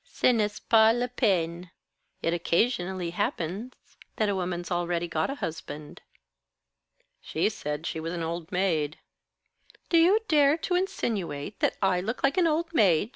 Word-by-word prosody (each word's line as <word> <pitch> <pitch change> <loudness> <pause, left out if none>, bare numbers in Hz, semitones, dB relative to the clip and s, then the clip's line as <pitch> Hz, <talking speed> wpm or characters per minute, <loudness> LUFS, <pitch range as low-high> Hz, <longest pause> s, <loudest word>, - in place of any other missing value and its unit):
"Ce - - -20
n'est 210 -3 0
pas 225 0 +6
la 245 0 0
peine. 180 -8 0 0.5
It 165 - +1
occasionally 175 0 0
happens 185 +8 -3 0.4
that 215 -2 +1
a - - +1
woman's 175 -1 -3
already 175 0 -1
got 160 -1 -1
a 275 - -3
husband." 155 - -7 1.2
"She 160 - 0
said 150 -6 -5
she 160 - -3
was 165 +1 -4
an 170 -1 -3
old 165 +2 -4
maid." 165 -6 0 0.9
"Do 335 - +5
you 380 +7 +5
dare 295 -1 +4
to 355 - -3
insinuate 205 - -2
that - - +1
I 180 -2 +2
look 225 +6 -4
like 275 +6 +2
an 345 - +4
old 330 +2 -1
maid?" 200 - +3
185 Hz, 155 wpm, -27 LUFS, 170-240 Hz, 1.2 s, pas